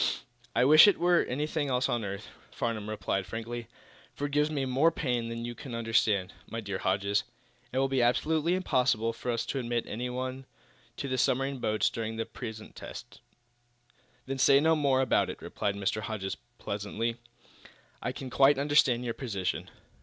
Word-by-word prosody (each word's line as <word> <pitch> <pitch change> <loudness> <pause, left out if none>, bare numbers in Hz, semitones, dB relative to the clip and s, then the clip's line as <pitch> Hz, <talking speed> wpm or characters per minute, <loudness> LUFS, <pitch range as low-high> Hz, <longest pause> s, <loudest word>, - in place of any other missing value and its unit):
"I 120 +2 +4
wish 155 +7 +9
it 205 - +5
were 175 0 +4
anything 150 +3 -1
else 125 0 +1
on 120 -2 -1
earth," 100 +1 -5 0.2
Farnum 110 -3 -3
replied, 95 -2 -2
frankly. 115 +3 -5 0.5
"For, - - -13
though - - +1
it 145 - -3
gives 150 +1 +2
me 140 -3 -1
more 135 +5 +4
pain 125 -7 -1
than 115 0 -4
you 120 - -4
can 120 0 -7
understand, 110 -4 +1 0.2
my 115 - -4
dear 100 -3 -4
Mr. - - -9
Hodges, 100 +1 +1 0.5
it 130 - -3
will 135 +1 +3
be 135 -1 +1
absolutely 155 +7 +2
impossible 125 -10 +1
for 125 - -6
us 115 -1 0
to 135 - -2
admit 120 -1 -1
anyone 130 +3 -4 0.5
to 140 - -3
the 130 -1 -1
submarine 135 +2 +1
boats 110 -2 +1
during 115 -1 -3
the 115 0 -2
present 110 -1 -8
tests." - - -9 1.1
"Then 135 0 -4
say 135 +1 +6
no 160 +2 +4
more 140 -3 +3
about 130 - +2
it," - - -6
replied 100 -1 -2
Mr. 100 +2 -1
Hodges, 105 -3 -3 0.2
pleasantly. 105 +3 -3 0.8
"I 125 - -1
can 130 0 -7
quite 135 +2 +5
understand 140 -4 +3
your 115 - -1
position." 100 -9 -3
125 Hz, 180 wpm, -29 LUFS, 110-135 Hz, 1.1 s, wish